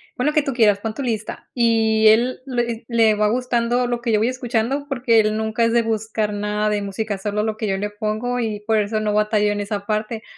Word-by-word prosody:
pon 250 - -2
lo 300 - +2
que 305 - +4
tú 275 - -2
quieras, 210 -4 +3
pon 220 0 -4
tu 280 - -6
lista". 220 -3 -4
Y 225 -2 +3
él 235 +4 +4
le 240 -3 -2
le 225 -2 +4
va 210 0 +2
gustando 245 0 0
lo 240 -1 -2
que 235 -2 -1
yo 210 - +3
voy 225 - +2
escuchando, 255 +2 -2
porque 240 -4 +2
él 215 0 0
nunca 220 +1 -1
es 230 - +1
de 235 - +4
buscar 220 -1 -2
nada 210 +1 -1
de 210 -1 0
música, 200 +1 -3
solo 210 +2 -2
lo 220 -1 -2
que 215 - -3
yo 195 0 0
le 205 +1 -3
pongo 215 +4 -3
y 215 -3 -2
por 220 +1 +1
eso 215 +1 -1
no 210 -1 -1
batallo 210 0 +2
en 205 - -4
esa 200 -1 -4
parte. 215 +1 -2
220 Hz, 245 wpm, -21 LUFS, 210-235 Hz, -, que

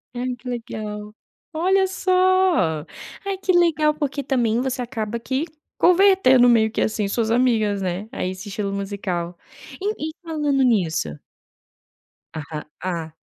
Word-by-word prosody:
Ai 250 0 -2
que 245 +1 -9
legal! 210 -3 -6 0.4
Olha 380 +4 +3
só! 370 - +2 0.4
Ai, 395 -1 -2
que 370 - +2
legal! 315 -4 +3
Porque 285 -2 -3
também 240 -4 +1
você 260 0 -2
acaba 235 -2 -3
que 265 +6 -2 0.3
convertendo 355 -10 +5
meio 220 -2 +4
que, - - -2
assim, 215 -2 0
suas 225 +2 -1
amigas, 220 -5 +2
né, 185 +4 -3
aí, 185 -8 -3
esse 190 +2 -8
estilo 200 0 -3
musical. 190 -4 -3 0.4
E 400 -6 -2
e - - -6
falando 295 -4 0
nisso 165 - +1 1.1
Ah, 155 -1 -6 0.2
ah. 170 -4 -3
240 Hz, 135 wpm, -22 LUFS, 200-305 Hz, 1.1 s, convertendo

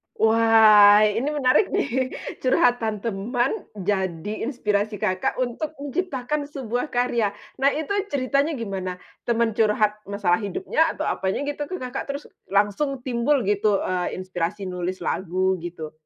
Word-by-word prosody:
Wah, 220 -2 +6
ini 215 +5 +1
menarik 295 +5 +3
nih, 265 -9 0 0.3
curhatan 245 -4 +2
teman, 235 - 0 0.2
jadi 190 +1 -2
inspirasi 210 -4 -1
Kakak 185 -1 -1
untuk 255 +5 -3
menciptakan 285 -1 -3
sebuah 250 -1 -3
karya. 235 -4 0 0.3
Nah, 275 - +5
itu 315 +4 -4 0.2
ceritanya 280 +3 0
gimana? 190 -5 -4 0.3
Teman 235 -1 +2
curhat 210 -1 +2
masalah 190 -3 +1
hidupnya 205 - 0
atau 310 - -3
apanya 190 +8 -1
gitu, 290 0 -3 0.4
terus 280 +1 -4 0.3
langsung 210 +7 0
timbul 255 +2 +1
gitu, 205 0 +2
eee, 180 -1 -2
inspirasi 185 +1 -3
nulis 180 0 -4
lagu 185 +1 0
gitu? 165 -3 -7
220 Hz, 125 wpm, -24 LUFS, 195-265 Hz, 0.4 s, Wah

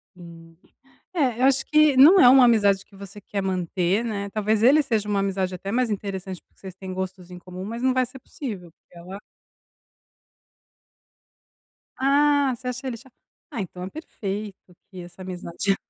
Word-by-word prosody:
hum, 165 -1 -14 0.6
é, 260 -8 0
eu - - +3
acho 270 0 +3
que 305 -3 +4
não 320 +9 +8
é 245 - +8
uma 260 0 +7
amizade 205 -4 +3
que 200 - -20
você 200 +1 -11
quer 200 0 -4
manter, 185 +3 -1
né, 200 -3 -3
talvez, 215 +1 0
ele 295 +4 +6
seja 220 -6 -1
uma 200 -1 +1
amizade 190 -1 -2
até 195 +2 -6
mais 250 +2 +1
interessante, 190 -2 -5
porque - - -40
vocês 190 -2 -9
têm 190 -1 -8
gostos 185 -1 -6
em 180 - -9
comum, 180 +1 -9
mas 230 +4 -6
não 260 0 +2
vai 255 0 +2
ser 255 +2 -11
possível 205 - -8
porque 170 +1 -20
ela 185 +3 -9 2.8
Ah, 285 0 +3
você 250 +2 -10
acha 250 +2 -5
ele 250 - -3
é - - -10
cha 260 +3 -18 0.4
ah 230 - -4
então, 180 -1 -8
é 185 - -5
perfeito 205 - -6 0.3
que 185 -2 -9
essa 175 +2 -13
amizade 185 +1 -2
200 Hz, 180 wpm, -24 LUFS, 185-255 Hz, 2.8 s, não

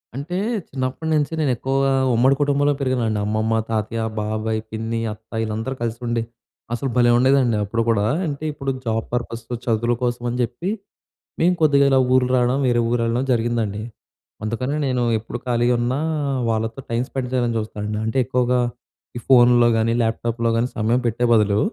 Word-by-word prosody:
అంటే, 155 +7 -4 0.3
చిన్నప్పటి 130 +4 -3
నుంచి 150 +1 +1
నేను 150 -4 +2
ఎక్కువగా, 135 +2 +1 0.2
ఉమ్మడి 130 +4 +4
కుటుంబంలో 145 0 +2
పెరిగానండి. 120 -5 0
అమ్మమ్మ, 110 +1 0 0.2
తాతయ్య, 110 +1 -1 0.2
బాబాయ్, 110 +1 -2
పిన్ని, 115 +1 -3
అత్త, 110 +1 -20
ఈళ్ళందరూ 110 +4 -3
కలిసి 115 0 -2
ఉండి, 115 -1 0 0.5
అసలు 125 +3 -2
భలే 120 -1 +5
ఉండేదండి 130 -2 +3
అప్పుడు 115 +3 -1
కూడా. 105 -3 +2 0.2
అంటే, 145 0 -5
ఇప్పుడు 135 -2 -3
జాబ్ 110 -1 -1
పర్పసు, 120 -1 -4
చదువుల 120 +1 +1
కోసం 120 0 -1
అని 120 - -3
చెప్పి, 125 - -3 0.7
మేము 180 +2 +4
కొద్దిగా 140 -2 +5
ఇలా 135 - +5 0.2
ఊరు 130 -1 +3
రావడం, 125 +1 +2
వేరే 120 -1 +2
ఊరెళ్ళడం 120 +1 0
జరిగిందండి. 115 -3 0 0.6
అందుకనే 125 +6 -2
నేను 125 -1 0 0.2
ఎప్పుడు 115 +2 -6
ఖాళీగా 120 0 +2
ఉన్నా, 125 +3 0 0.5
వాళ్ళతో 115 +2 -1
టైం 115 0 0
స్పెండ్ 130 -2 -3
చేయాలని 120 -2 +1
చూస్తానండి. 105 0 -4
అంటే, 110 +4 -2
ఎక్కువగా 125 0 +1 0.6
ఈ - - -3
ఫోన్‌లో 120 -2 +6
కానీ, 115 +1 +1
ల్యాప్‌టాప్‌లో 115 +1 -1
కానీ, 120 +2 0
సమయం 115 +3 +1
పెట్టే 120 +2 0
బదులు, 105 -2 +3
120 Hz, 155 wpm, -21 LUFS, 115-130 Hz, 0.7 s, ఫోన్‌లో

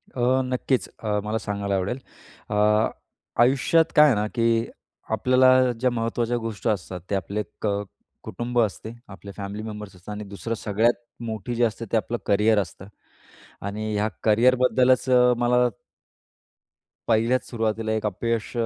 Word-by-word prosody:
अ, 130 +1 +2
नक्कीच. 125 0 -1
अ, 105 -1 0
मला 110 +1 -1
सांगायला 100 -1 -2
आवडेल, 95 +6 -1 0.5
अ, 105 - -2 0.9
आयुष्यात 140 +6 +3
काय 150 0 +8
आहे 135 - +4
ना, 105 +1 0
की 115 -1 +2 0.5
आपल्याला 130 +2 +4
ज्या 125 +1 +2
महत्त्वाच्या 115 +1 -1
गोष्टी 115 -1 -3
असतात, 95 -3 -3
ते 100 - 0
आपले 100 +2 -2 0.2
क 110 - 0 0.6
कुटुंब 120 +1 -3
असते, 110 0 -2 0.2
आपले 100 +1 -10
फॅमिली 100 +1 -5
मेंबर्स 105 -3 -8
असतात. 90 +3 -11
आणि 105 +1 -6
दुसरं, 100 +2 -5
सगळ्यात 110 +3 +1 0.3
मोठी 110 +1 -4
जी 120 - +1
असते, 115 0 -1
ते 115 - +3
आपलं 115 +2 -2
करिअर 105 +1 +3
असतं 95 0 -5 0.8
आणि 105 +1 -3
ह्या 105 +1 +1 0.2
कॅरिअरबद्दलच 125 +3 +4 0.3
मला 125 0 +3 1.4
पहिल्याच 115 +3 +2
सुरुवातीला 110 -1 -1
एक 110 0 -1
अपयश 115 +2 -2
110 Hz, 140 wpm, -24 LUFS, 105-120 Hz, 1.4 s, काय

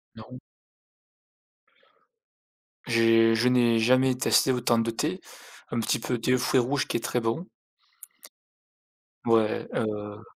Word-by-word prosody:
Non. - - -12 2.5
J'ai 115 -1 +3
je 115 +2 +1
n'ai 120 -2 +3
jamais 130 +3 +2
testé 130 +1 +2
autant 120 -2 +1
de 115 0 -1
thé, 155 +11 -3 0.5
un 120 - -3
petit 115 - -1
peu 120 +1 -3
thé 125 +2 0
aux 130 - +1
fruits 130 +1 +1
rouge 130 +3 -1
qui - - -1
est - - -4
très 120 +1 -2
bon. 115 +10 -3 1.8
Ouais, 115 -2 +1
heu 105 0 -4
115 Hz, 125 wpm, -26 LUFS, 115-125 Hz, 2.5 s, J'ai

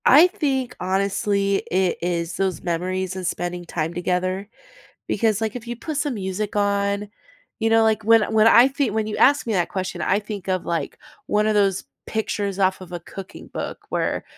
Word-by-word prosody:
I 305 +7 +8
think 270 - -2
honestly, 200 +1 +1
it 185 -1 +2
is 170 -1 -2
those 190 -4 -1
memories 185 +2 -2
and 185 -1 -5
spending 175 0 -3
time 165 0 -3
together. 185 +3 -1 0.6
Because, 215 -1 +1
like, 220 0 -2
if 245 -1 -7
you 240 - -3
put 300 +5 -5
some 290 -3 -1
music 200 +1 -3
on, 200 0 0 0.5
you 225 0 +1
know, 225 0 +5
like 220 -1 +2
when 225 +1 +6
when 220 0 +6
I 235 +2 +8
thi 275 -2 0
when 220 0 0
you 215 - -3
ask 285 +2 +4
me 230 - -1
that 175 -3 +1
question, 190 -2 -4
I 195 - +2
think 205 -3 -7
of, 185 -1 -1
like, 170 -1 -2 0.3
one 210 0 +2
of 215 - +2
those 195 -2 +2 0.2
pictures 205 -3 -2
off 190 0 +2
of 180 -1 -10
a 175 - -4
cooking 190 +2 -10
book - - -6
where, - - -1
200 Hz, 190 wpm, -23 LUFS, 185-220 Hz, 0.6 s, I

